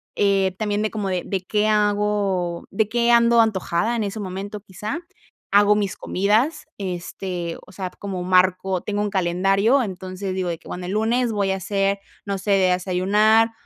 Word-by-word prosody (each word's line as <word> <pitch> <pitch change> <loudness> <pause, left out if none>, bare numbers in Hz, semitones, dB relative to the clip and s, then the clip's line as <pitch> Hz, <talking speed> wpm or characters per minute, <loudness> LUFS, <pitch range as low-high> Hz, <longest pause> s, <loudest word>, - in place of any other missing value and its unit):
Eh, 195 -2 +2
también 210 -1 0
de 215 - -1
cómo 210 -3 -3
de 185 +1 -2
qué 210 0 +1
hago 205 -4 0
¿De 210 +2 0
qué 240 0 +2
ando 235 0 +6
antojada 215 +1 0
en 225 - -1
ese 205 +2 -4
momento, 200 +2 -5
quizá? 210 - -5 0.5
Hago 205 +1 +6
mis 200 -2 -1
comidas, 215 - +1
este, 180 -2 -4
o 185 - -15
sea, 185 -1 -4
como 190 -2 -6
marco 185 +1 +2
tengo 205 +2 -3
un 210 - 0
calendario, 195 +7 +2
entonces 185 -1 -5
digo 185 -1 -2
de 170 -1 -2
que: - - -15
"Bueno, 180 0 -5
el 185 - -3
lunes 230 +2 +1
voy 200 -2 0
a 190 - -1
hacer, 195 +1 0 0.3
no 200 -1 -2
sé, 195 -1 +2
a - - +4
desayunar, 210 +5 +3
200 Hz, 175 wpm, -22 LUFS, 185-210 Hz, 0.5 s, ando